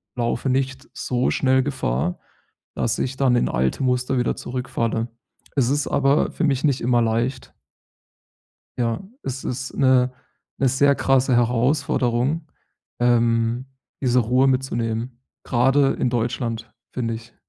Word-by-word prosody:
laufe 120 Hz, +2 st, -1 dB
nicht 130 Hz, +1 st, -1 dB
so 125 Hz, 0 st, -1 dB
schnell 130 Hz, -1 st, +2 dB
Gefahr, 90 Hz, -, -1 dB, 0.6 s
dass 115 Hz, -, 0 dB
ich 130 Hz, +1 st, -2 dB
dann 130 Hz, -3 st, +3 dB
in 120 Hz, -, +2 dB
alte 65 Hz, -, 0 dB
Muster 125 Hz, +1 st, +1 dB
wieder 120 Hz, -, 0 dB
zurückfalle. 120 Hz, -2 st, -2 dB, 0.5 s
Es 130 Hz, -4 st, +3 dB
ist 145 Hz, 0 st, 0 dB
aber 140 Hz, +1 st, +2 dB
für -, -, -3 dB
mich 135 Hz, -3 st, +1 dB
nicht 140 Hz, -4 st, +2 dB
immer 120 Hz, 0 st, +2 dB
leicht. 115 Hz, +4 st, -1 dB, 1.3 s
Ja, 115 Hz, +2 st, 0 dB, 0.2 s
es 130 Hz, 0 st, -5 dB
ist 130 Hz, +1 st, -4 dB
'ne 130 Hz, -2 st, +4 dB, 0.5 s
'ne 135 Hz, -, +3 dB
sehr 140 Hz, +2 st, +3 dB
krasse 135 Hz, -1 st, +2 dB
Herausforderung, 125 Hz, +4 st, +1 dB, 0.5 s
ähm, 120 Hz, 0 st, +2 dB, 0.3 s
diese 125 Hz, -2 st, +2 dB
Ruhe 125 Hz, +3 st, +3 dB
mitzunehmen, 120 Hz, -2 st, -2 dB, 0.2 s
grade 135 Hz, +3 st, +3 dB
in 125 Hz, -, +1 dB
Deutschland, 115 Hz, -1 st, -2 dB, 0.2 s
finde 115 Hz, -3 st, -2 dB
ich. 115 Hz, +1 st, -10 dB
125 Hz, 130 wpm, -22 LUFS, 120-130 Hz, 1.3 s, ne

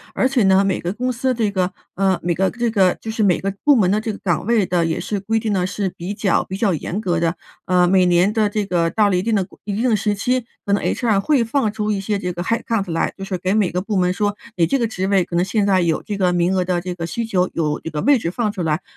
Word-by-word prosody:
而 260 Hz, -, +3 dB
且 265 Hz, -2 st, +1 dB
呢， 190 Hz, 0 st, +4 dB
每 195 Hz, -, 0 dB
个 175 Hz, -, -3 dB
公 250 Hz, +5 st, -2 dB
司 260 Hz, +2 st, 0 dB
这 225 Hz, -4 st, 0 dB
个 185 Hz, -2 st, 0 dB, 0.2 s
呃， 190 Hz, -1 st, +1 dB
每 175 Hz, 0 st, +1 dB
个 190 Hz, +2 st, +1 dB
这 240 Hz, -2 st, -2 dB
个 190 Hz, -4 st, +3 dB
就 225 Hz, -, -7 dB
是 220 Hz, 0 st, -3 dB
每 190 Hz, -4 st, +3 dB
个 195 Hz, 0 st, -2 dB
部 290 Hz, -1 st, +6 dB
门 195 Hz, -6 st, +3 dB
的 210 Hz, +2 st, +1 dB
这 220 Hz, -, -3 dB
个 205 Hz, -, -7 dB
岗 175 Hz, -2 st, -1 dB
位 230 Hz, -5 st, +3 dB
的 175 Hz, -1 st, +1 dB
也 165 Hz, -1 st, -1 dB
是 205 Hz, -, -3 dB
规 225 Hz, +3 st, 0 dB
定 215 Hz, -2 st, -2 dB
的 180 Hz, -1 st, 0 dB
是 195 Hz, 0 st, -2 dB
比 180 Hz, +4 st, -5 dB
较 195 Hz, -4 st, +1 dB
比 190 Hz, -, -6 dB
较 200 Hz, -2 st, +1 dB
严 175 Hz, +5 st, -3 dB
格 175 Hz, -5 st, 0 dB
的。 165 Hz, +1 st, 0 dB, 0.3 s
呃， 180 Hz, -1 st, +3 dB
每 185 Hz, -1 st, +4 dB
年 180 Hz, +4 st, +3 dB
的 215 Hz, -2 st, +2 dB
这 210 Hz, -1 st, -2 dB
个 170 Hz, -3 st, +1 dB
到 205 Hz, +3 st, +2 dB
了 185 Hz, -, +1 dB
一 180 Hz, -, +1 dB
定 225 Hz, +2 st, 0 dB
的 195 Hz, -3 st, +1 dB
规 -, -, -20 dB
一 205 Hz, -, -3 dB
定 240 Hz, +4 st, +1 dB
的 -, -, +4 dB
时 210 Hz, 0 st, 0 dB
期， 250 Hz, +4 st, 0 dB, 0.2 s
可 200 Hz, -, 0 dB
能 200 Hz, -, +2 dB
HR 225 Hz, -5 st, +1 dB
会 255 Hz, +4 st, +2 dB
放 230 Hz, -2 st, 0 dB
出 215 Hz, 0 st, -2 dB
一 200 Hz, -2 st, -1 dB
些 205 Hz, +1 st, -1 dB
这 180 Hz, -2 st, -3 dB
个 175 Hz, -, -5 dB
headcount 215 Hz, -1 st, -1 dB
来 165 Hz, -, -1 dB
就 195 Hz, -, -8 dB
是 190 Hz, -1 st, -3 dB
给 185 Hz, +2 st, -1 dB
每 210 Hz, -4 st, +2 dB
个 180 Hz, -, -2 dB
部 205 Hz, +3 st, -3 dB
门 180 Hz, -1 st, +2 dB
说 205 Hz, +2 st, -1 dB, 0.2 s
你 170 Hz, -, +4 dB
这 270 Hz, +11 st, 0 dB
个 235 Hz, -, +1 dB
职 190 Hz, -3 st, -3 dB
位 195 Hz, -1 st, +3 dB
可 170 Hz, -, -6 dB
能 175 Hz, +1 st, +2 dB
现 205 Hz, 0 st, 0 dB
在 190 Hz, -2 st, +3 dB
有 165 Hz, -2 st, 0 dB
这 205 Hz, -, -5 dB
个 180 Hz, -2 st, +2 dB
名 175 Hz, +2 st, +1 dB
额 180 Hz, -1 st, +1 dB
的 180 Hz, -1 st, 0 dB
这 180 Hz, 0 st, -5 dB
个 170 Hz, -2 st, -4 dB
需 230 Hz, +6 st, -3 dB
求， 185 Hz, -5 st, +1 dB
有 150 Hz, -3 st, -1 dB
这 160 Hz, -, -7 dB
个 150 Hz, -1 st, -3 dB
位 285 Hz, 0 st, +4 dB
置 170 Hz, -7 st, -3 dB
放 220 Hz, 0 st, -1 dB
出 195 Hz, -4 st, -4 dB
来， 155 Hz, +1 st, 0 dB
195 Hz, 355 characters per minute, -20 LUFS, 180-215 Hz, 0.3 s, 部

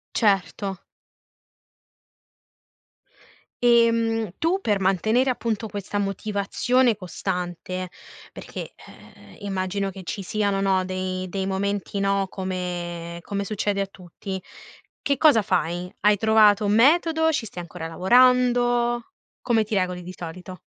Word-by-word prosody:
Certo. 195 Hz, -2 st, 0 dB, 2.8 s
Ehm, 230 Hz, -3 st, +3 dB
tu 340 Hz, +5 st, +1 dB
per 205 Hz, -2 st, +1 dB
mantenere 220 Hz, +7 st, +2 dB
appunto 230 Hz, -3 st, -2 dB
questa 205 Hz, 0 st, -4 dB
motivazione 210 Hz, +4 st, +1 dB
costante, 180 Hz, -1 st, -4 dB, 0.4 s
perché, -, -, -8 dB, 0.2 s
ehm, -, -, -16 dB
immagino 195 Hz, 0 st, -2 dB
che 190 Hz, -, -10 dB
ci 195 Hz, +2 st, -5 dB
siano, 200 Hz, 0 st, 0 dB
no, 190 Hz, -1 st, +2 dB
dei 185 Hz, 0 st, -3 dB
dei 190 Hz, +1 st, -3 dB
momenti 200 Hz, +1 st, -2 dB
no, 195 Hz, 0 st, +1 dB
come 175 Hz, -2 st, -4 dB
come 200 Hz, +2 st, -4 dB
succede 205 Hz, -1 st, -1 dB
a -, -, -2 dB
tutti, 190 Hz, 0 st, -8 dB, 0.6 s
che 280 Hz, -2 st, 0 dB
cosa 285 Hz, -9 st, +5 dB
fai? 180 Hz, 0 st, -1 dB
Hai 210 Hz, 0 st, +4 dB
trovato 215 Hz, -1 st, +4 dB
un 205 Hz, +1 st, +2 dB
metodo, 320 Hz, +5 st, +4 dB
ci 275 Hz, -7 st, -1 dB
stai 180 Hz, -, -8 dB
ancora 165 Hz, -1 st, -7 dB
lavorando? 240 Hz, +4 st, +3 dB, 0.3 s
Come 225 Hz, -3 st, +2 dB
ti 215 Hz, -, -4 dB
regoli 180 Hz, -2 st, -1 dB
di 180 Hz, +1 st, -9 dB
solito? 180 Hz, +2 st, -8 dB
200 Hz, 120 wpm, -24 LUFS, 185-225 Hz, 2.8 s, cosa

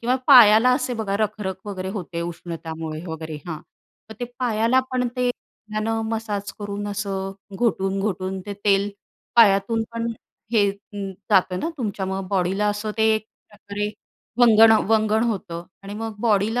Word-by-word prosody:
किंवा 245 Hz, +2 st, +1 dB
पायाला 245 Hz, -3 st, +8 dB
असे 255 Hz, -1 st, 0 dB
बघा 210 Hz, -3 st, -1 dB
रखरख 210 Hz, -2 st, -2 dB
वगैरे 190 Hz, -2 st, -4 dB
होते 175 Hz, -4 st, -5 dB
उष्णतामुळे 165 Hz, -2 st, -6 dB
वगैरे? 160 Hz, -1 st, -6 dB
हां, 165 Hz, -3 st, -4 dB, 0.5 s
तर 220 Hz, -, -9 dB
ते -, -, 0 dB
पायाला 235 Hz, 0 st, +2 dB
पण 250 Hz, -1 st, 0 dB
ते 250 Hz, 0 st, +1 dB
त्यानं 220 Hz, -1 st, -4 dB
मसाज 210 Hz, -3 st, -3 dB
करून 205 Hz, 0 st, -4 dB
असं 195 Hz, -1 st, -3 dB, 0.2 s
घोटून, 195 Hz, -3 st, 0 dB
घोटून 190 Hz, -1 st, -2 dB
ते 205 Hz, -, -4 dB
तेल 200 Hz, 0 st, +3 dB, 0.5 s
पायातून 225 Hz, 0 st, +5 dB
पण 230 Hz, 0 st, -2 dB, 0.5 s
हे 205 Hz, -3 st, +4 dB
अं, 200 Hz, 0 st, -7 dB, 0.2 s
जातं 185 Hz, -2 st, +3 dB
ना -, -, -1 dB
तुमच्यामुळे 195 Hz, -4 st, -3 dB
बॉडीला 195 Hz, +2 st, +1 dB
असं 205 Hz, +1 st, -2 dB
ते 220 Hz, 0 st, +4 dB
एक 215 Hz, -, -2 dB, 0.2 s
प्रकारे 205 Hz, 0 st, -5 dB, 0.5 s
वंगण 225 Hz, -2 st, +8 dB, 0.2 s
वंगण 220 Hz, 0 st, +3 dB
होतं. 170 Hz, -5 st, -5 dB, 0.2 s
आणि 200 Hz, +1 st, -7 dB
मग 225 Hz, 0 st, -5 dB
बॉडीला 220 Hz, +1 st, +2 dB
205 Hz, 150 wpm, -23 LUFS, 195-225 Hz, 0.5 s, पायाला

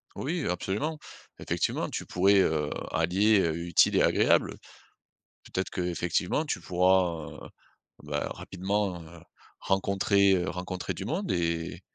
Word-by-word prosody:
Oui, 160 Hz, +5 st, -2 dB
heu, -, -, 0 dB
absolument. 105 Hz, -, -2 dB, 0.4 s
Effectivement -, -, -1 dB
tu -, -, -5 dB
pourrais, 95 Hz, +2 st, +3 dB
heu, 75 Hz, -5 st, +1 dB, 0.2 s
allier, 95 Hz, +6 st, +3 dB
heu, 80 Hz, -3 st, 0 dB
utile 85 Hz, -, +4 dB
et -, -, +4 dB
agréable. -, -, +3 dB, 0.9 s
Peut-être 95 Hz, -, -3 dB
qu'effectivement, 90 Hz, -, -1 dB
tu 145 Hz, -, -3 dB
pourras, 90 Hz, -3 st, +1 dB
heu, -, -, -11 dB, 0.6 s
bah, 75 Hz, 0 st, -3 dB
rapidement, 95 Hz, 0 st, -2 dB
heu, 85 Hz, +2 st, -13 dB, 0.4 s
rencontrer, 100 Hz, 0 st, +2 dB
heu, 90 Hz, 0 st, 0 dB
rencontrer 90 Hz, 0 st, -4 dB
du 95 Hz, -, -6 dB
monde 175 Hz, -, -2 dB
et 85 Hz, -1 st, -2 dB
95 Hz, 130 wpm, -28 LUFS, 85-100 Hz, 0.9 s, utile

